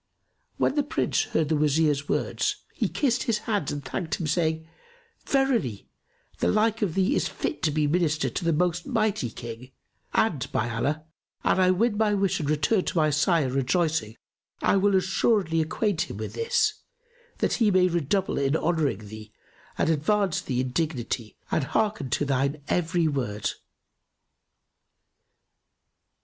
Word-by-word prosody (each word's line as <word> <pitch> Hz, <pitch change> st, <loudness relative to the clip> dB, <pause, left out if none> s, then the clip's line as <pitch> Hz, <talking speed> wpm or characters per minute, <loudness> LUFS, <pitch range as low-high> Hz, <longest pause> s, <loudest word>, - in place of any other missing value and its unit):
When -, -, +2 dB
the 295 Hz, -, +2 dB
Prince 290 Hz, -, 0 dB
heard 155 Hz, -2 st, 0 dB
the 160 Hz, -, +2 dB
Wazir's 150 Hz, -1 st, +2 dB
words, -, -, -1 dB
he -, -, -1 dB
kissed 255 Hz, -4 st, +1 dB
his 220 Hz, -, +3 dB
hands 210 Hz, -8 st, -2 dB
and 145 Hz, -2 st, -5 dB
thanked 160 Hz, +4 st, -3 dB
him, 170 Hz, -, -4 dB
saying, 160 Hz, 0 st, 0 dB, 0.6 s
"Verily, 245 Hz, -, 0 dB, 0.5 s
the -, -, +1 dB
like 220 Hz, +1 st, +2 dB
of 190 Hz, -7 st, 0 dB
thee 195 Hz, +9 st, +2 dB
is -, -, +1 dB
fit -, -, -4 dB
to 160 Hz, -, +2 dB
be 150 Hz, 0 st, +1 dB
Minister 155 Hz, 0 st, +1 dB
to -, -, -3 dB
the 165 Hz, -, +2 dB
most 175 Hz, -, 0 dB
mighty 215 Hz, -, 0 dB
King, 115 Hz, +2 st, -8 dB, 0.4 s
and, -, -, 0 dB
by 120 Hz, +2 st, -1 dB
Allah, 145 Hz, +7 st, -1 dB, 0.4 s
an -, -, +2 dB
I 185 Hz, -1 st, +5 dB
win 210 Hz, +4 st, +2 dB
my 210 Hz, -2 st, +3 dB
wish 195 Hz, -1 st, +1 dB
and 150 Hz, -3 st, -2 dB
return 170 Hz, +7 st, +2 dB
to -, -, -2 dB
my 155 Hz, -1 st, +3 dB
sire, 150 Hz, -1 st, +2 dB
rejoicing, 135 Hz, -, 0 dB, 0.5 s
I -, -, +4 dB
will 195 Hz, 0 st, +3 dB
assuredly 190 Hz, -2 st, +2 dB
acquaint 170 Hz, +2 st, -1 dB
him -, -, -6 dB
with -, -, -5 dB
this, 460 Hz, -2 st, 0 dB, 0.6 s
that -, -, 0 dB
he 220 Hz, -, +5 dB
may 185 Hz, -2 st, +4 dB
redouble 175 Hz, +2 st, 0 dB
in 140 Hz, +1 st, +1 dB
honouring 155 Hz, -, 0 dB
thee 110 Hz, 0 st, -10 dB, 0.5 s
and -, -, +1 dB
advance 185 Hz, +4 st, +1 dB
thee 125 Hz, -1 st, -1 dB
in 130 Hz, -1 st, -3 dB
dignity 125 Hz, -7 st, -2 dB
and 155 Hz, -, +1 dB
hearken 205 Hz, -1 st, -1 dB
to 145 Hz, -, 0 dB
thine 140 Hz, +2 st, 0 dB
every 175 Hz, -1 st, +1 dB
word." 120 Hz, -8 st, -2 dB
160 Hz, 160 wpm, -26 LUFS, 140-200 Hz, 0.6 s, I